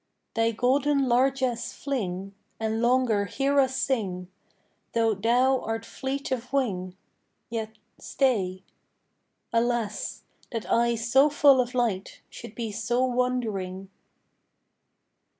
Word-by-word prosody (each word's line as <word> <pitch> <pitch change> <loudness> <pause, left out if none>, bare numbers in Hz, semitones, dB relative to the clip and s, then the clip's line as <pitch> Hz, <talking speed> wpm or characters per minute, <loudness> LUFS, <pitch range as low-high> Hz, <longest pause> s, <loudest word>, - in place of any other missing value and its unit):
Thy 225 0 +2
golden 270 +4 +2
largess 255 -1 +1
fling, 195 -8 -3 0.3
And 220 0 -1
longer 240 -4 +2
hear 275 +7 +1
us 265 -1 +2
sing; 185 -9 -1 0.6
Though 225 -2 +2
thou 245 +6 +2
art 225 +1 -3
fleet 270 +3 -4
of 250 -1 -3
wing, 190 -9 -1 0.5
Yet 220 -1 -4 0.2
stay. 190 -9 0 0.9
Alas! 230 -3 -1 0.3
that 230 -3 -3
eyes 235 -1 +1
so 265 +5 +5
full 280 -2 +5
of 250 +1 -5
light 220 -6 -1
Should 210 - -10
be 230 -2 -3
so 240 +4 0
wandering! 220 -7 -2
235 Hz, 110 wpm, -26 LUFS, 215-260 Hz, 0.9 s, so